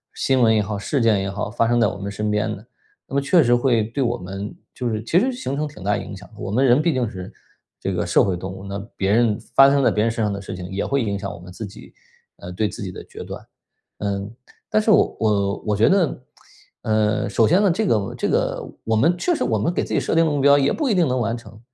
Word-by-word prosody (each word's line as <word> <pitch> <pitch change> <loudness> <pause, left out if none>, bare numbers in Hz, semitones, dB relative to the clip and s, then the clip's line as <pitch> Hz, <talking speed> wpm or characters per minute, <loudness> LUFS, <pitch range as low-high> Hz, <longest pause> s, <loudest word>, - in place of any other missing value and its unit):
新 130 -1 +1
闻 110 -2 +5
也 110 - +3
好， 105 0 -2
事 130 +7 -1
件 115 -4 +3
也 95 - -2
好， 100 +2 -4
发 115 0 +1
生 120 +1 +2
在 115 - +4
我 - - -1
们 100 0 -4
身 105 +1 -2
边 105 0 0
的， - - -14 0.4
那 - - -13
么 140 - +2
确 160 +4 +4
实 120 -1 +3
会 120 -3 +2
对 115 +6 -2
我 120 0 0
们 95 +1 -7 0.2
就 125 -2 -3
是 110 -1 -3
其 160 +10 +3
实 260 +6 +1
形 245 - -4
成 150 +2 -1
挺 145 -10 -12
大 105 +1 +1
影 100 - -7
响 105 - -13
的。 110 - -17
我 - - -5
们 125 +6 +2
人 125 +3 +5
毕 170 +2 +2
竟 125 -3 0
是 95 -3 -8 0.5
这 95 - -2
个 90 -1 -1
社 85 - +3
会 95 -3 0
动 95 +1 -6
物， 95 0 -9
那 100 0 -5 0.2
别 95 +1 0
人 115 -1 +3 0.2
发 135 0 +8
生 140 0 +2
在 - - +4
别 105 - +1
人 115 - +2
身 115 -1 -1
上 105 - -1
的 100 - -5
事 95 - -7
情， 90 -1 -7
也 95 - -2
会 140 -2 0
影 100 -2 -2
响 100 0 -5
我 - - -9
们 90 +1 -12
自 110 - -7
己 100 -2 -11 0.4
呃， 90 - -9
对 105 +4 0
自 115 - -8
己 95 -3 -4
的 - - -9
决 - - -10
断。 - - -9 0.5
呃， 100 -1 -2 0.4
但 215 - +2
是 215 - -1
我 215 - +4
我 100 -2 +1
我 105 - +2
觉 105 +3 +4
得， 175 -9 +1 0.6
呃， 105 -1 +1
首 110 +2 +3
先 185 +5 +4
呢， 200 - +4
这 205 +5 0
个 105 - 0
这 - - -1
个 - - -1 0.2
我 110 - 0
们 160 +11 +3
确 345 - +1
实 - - -1
我 110 -3 0
们 110 - 0
给 175 - -1
自 - - -5
己 - - +3
设 - - -1
定 165 0 +4
的 155 - +1
目 145 -1 0
标 140 +1 +6
也 140 0 +2
不 300 -4 -1
一 215 - +2
定 175 -4 +3
能 130 0 0
完 115 0 -1
成。 110 -1 -13
110 Hz, 310 characters per minute, -22 LUFS, 100-135 Hz, 0.6 s, 发